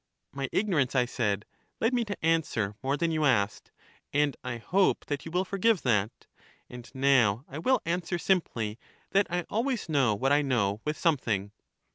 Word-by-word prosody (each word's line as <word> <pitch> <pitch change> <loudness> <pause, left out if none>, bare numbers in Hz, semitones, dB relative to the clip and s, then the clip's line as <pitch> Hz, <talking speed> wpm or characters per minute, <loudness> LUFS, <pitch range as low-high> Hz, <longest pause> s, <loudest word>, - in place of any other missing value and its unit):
My 135 -1 -3
ignorance, 160 - +1
I 125 -2 +4
said, 105 -4 -1 0.3
led 225 +3 +1
me 245 -1 +2
to 205 -6 -5
answer 155 -11 +1
more 135 +2 0
than 170 0 0
you 155 -1 0
asked, 105 -8 +1 0.4
and 145 -1 +1
I 125 -2 -4
hope 185 +11 +1
that 145 -1 -4
you 165 - -7
will 180 +2 0
forgive 195 +1 +1
that. 110 -3 0 0.5
And 125 -1 -10
now 130 -4 +3
I 140 - -7
will 260 +10 +2
answer 175 +1 -1
simply 120 - -1 0.3
that 200 +1 +3
I 175 0 -1
always 235 +2 -1
know 135 -8 +3
what 135 +7 0
I 145 +1 +5
know 110 -7 0
with 150 0 -2
something. 110 - 0
140 Hz, 175 wpm, -28 LUFS, 120-175 Hz, 0.5 s, I